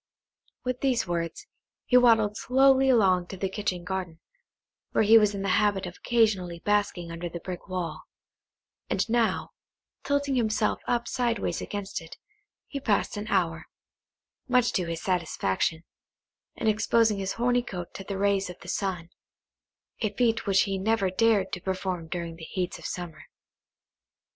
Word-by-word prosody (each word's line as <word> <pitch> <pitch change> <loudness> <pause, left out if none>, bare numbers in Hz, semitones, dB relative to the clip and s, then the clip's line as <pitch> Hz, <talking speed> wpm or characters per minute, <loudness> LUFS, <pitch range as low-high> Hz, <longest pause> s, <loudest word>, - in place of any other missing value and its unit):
With 250 -1 -3
these 255 -4 +1
words, 170 -2 -3 0.4
he 250 - +1
waddled 225 -4 +5
slowly 265 +2 +4
along 190 -7 +4
to 195 - -8
the 195 - -1
kitchen 190 -3 -3
garden, 180 -3 -4 0.7
where - - +4
he 225 +2 +8
was 210 -1 +2
in 195 - -3
the 195 - -1
habit 200 -2 +1
of 175 0 -8
occasionally 205 -7 +1
basking 190 -2 0
under 170 +1 -5
the 170 - -6
brick 180 0 -7
wall; 185 -3 -4 0.8
and - - 0
now, 230 0 +1 0.5
tilting 285 0 0
himself 220 -3 +1
up 240 -1 0
sideways 235 -4 -1
against 200 -3 -4
it, 165 - -12 0.5
he 280 - -5
passed 220 -6 0
an 205 +1 -5
hour, 170 -6 0 0.8
much 250 -1 +3
to 180 - 0
his 165 -1 -4
satisfaction, 165 - 0 0.7
in - - -5
exposing 220 0 +3
his 195 0 -2
horny 245 +1 +2
coat 180 -7 -7
to 195 - -7
the 195 0 -4
rays 200 -1 +1
of 180 - -8
the 175 - -9
sun; 180 -4 -2 0.9
a 215 -3 0
feat 225 0 +1
which 195 -1 +4
he 195 -1 -2
never 200 -2 +1
dared 205 -1 +2
to 180 - -3
perform 185 -3 -3
during 170 -1 -5
the 165 - -11
heats 180 +2 -3
of - - -6
summer. 170 -3 -6
195 Hz, 160 wpm, -27 LUFS, 180-225 Hz, 0.9 s, he